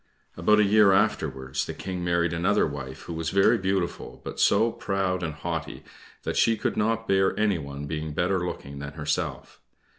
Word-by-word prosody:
About 95 +6 +3
a - - +6
year 105 -1 +5
afterwards 65 -8 0
the - - -6
King 90 -2 -5
married 85 -1 +1
another 90 +5 +2
wife, 70 -3 -6
who 85 - -6
was 80 0 -2
very 95 0 +4
beautiful, 95 -2 -2
but - - -6
so 110 +3 +4
proud 95 -3 -1
and 80 -3 -3
haughty 70 - -5 0.4
that - - -3
she 115 -1 +3
could - - -1
not 115 +1 0
bear 95 +1 +2
anyone 80 -10 -1
to - - -4
be 80 +1 -3
better 90 +4 0
looking 70 -5 -6
than 70 0 -6
herself. 75 0 -3
90 Hz, 180 wpm, -26 LUFS, 75-100 Hz, 0.4 s, a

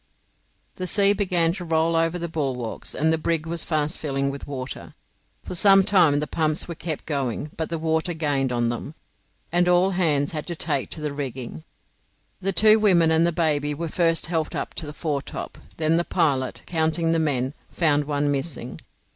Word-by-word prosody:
The 185 - -3
sea 200 +1 +5
began 180 -5 +2
to 185 -1 -6
roll 165 0 +1
over 165 +1 +1
the 170 -1 -3
bulwarks, 135 -8 -3
and 160 +3 +2
the 160 - 0
brig 160 0 -1
was 165 0 -1
fast 155 0 -1
filling 140 -2 -1
with 140 - -8
water. 135 -2 -7 0.5
For - - -6
some 195 +2 +6
time 180 -8 +4
the 150 - -1
pumps 155 0 -1
were 170 - -5
kept 160 -1 -5
going, 140 -1 -3
but 160 - -3
the 165 - -2
water 160 +2 -1
gained 145 -4 0
on 120 -1 0
them, 120 +6 -5 0.6
and 175 +1 +3
all 180 +2 +4
hands 155 -6 +1
had 155 -2 -5
to 170 - -3
take 140 -4 -2
to 155 - -6
the 150 -1 -3
rigging. 130 - -6 0.8
The 195 +1 +1
two 215 +4 +5
women 175 -6 +4
and 160 +1 +4
the - - +1
baby 150 -3 0
were 165 +2 -4
first 165 0 +1
helped 160 -2 -2
up - - -4
to 160 - -6
the 150 - -7
foretop; 145 -3 -4 0.2
then 160 +1 +2
the 170 - +2
pilot, 140 -8 0
counting 165 0 +1
the 165 - +2
men, 135 -4 0 0.2
found 150 -4 +1
one 145 0 0
missing. 135 - -4
160 Hz, 190 wpm, -24 LUFS, 145-170 Hz, 0.8 s, some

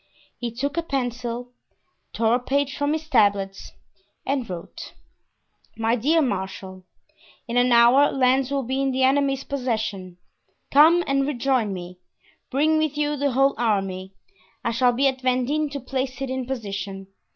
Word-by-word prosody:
He 240 - -3
took 280 +6 -3
a - - +2
pencil, 245 -4 -3 0.6
tore 225 0 +1
a 245 - +3
page 275 +2 -1
from 285 +1 0
his 315 0 -4
tablets 200 -7 +1 0.5
and 265 -5 -2
wrote: 175 -2 -8 0.8
"My 225 +1 +1
Dear 305 +7 +2
Marshal,—In 190 +2 -7
an 245 0 +3
hour 240 +5 +6
Lens 260 0 +2
will 275 -1 -1
be 265 +3 -2
in 275 - +1
the 260 0 0
enemy's 275 0 +2
possession. 220 -9 -3 0.5
Come 325 +5 +6
and 275 0 +1
rejoin 255 -5 0
me; 180 -1 -7 0.5
bring 310 +4 +2
with 310 -2 -1
you 295 0 0
the 285 -2 -1
whole 270 +2 +3
army. 195 -4 -1 0.5
I 235 - +1
shall 245 +2 +3
be 265 +3 +2
at 265 -1 -2
Vendin 260 +4 0
to 280 0 -5
place 260 0 -4
it 270 -1 -3
in 260 -1 -3
position. 195 -6 -5
255 Hz, 150 wpm, -23 LUFS, 225-275 Hz, 0.8 s, hour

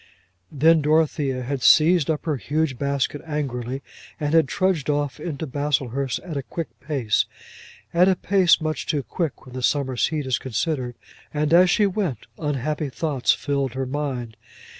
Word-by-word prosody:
Then 160 +3 +4
Dorothea 150 -4 +1
had 135 +1 -3
seized 160 +2 +5
up 155 0 -1
her 155 -4 0
huge 145 -1 -1
basket 140 +1 -1
angrily, 135 -4 -3 0.4
and 150 0 -1
had 160 -4 +5
trudged 185 -6 0
off 145 -1 -1
into 155 -1 -4
Baslehurst 135 -2 -1
at 175 -4 -7
a - - -1
quick 165 +4 -5
pace, 130 -6 0 0.7
at 180 +3 +5
a 190 - +3
pace 185 -2 +3
much 155 -1 -3
too 145 -3 0
quick 160 - -4
when 130 - -12
the 130 - -5
summer's 130 -1 +1
heat 150 -2 -3
is 130 -2 0
considered; 130 0 -2 0.4
and 150 +1 0
as 180 +1 +7
she 205 +5 +4
went, 185 - -2
unhappy 150 0 -2
thoughts 140 -2 0
filled 140 -3 -1
her 135 0 -1
mind. 130 -5 -4
145 Hz, 160 wpm, -23 LUFS, 130-160 Hz, 0.7 s, as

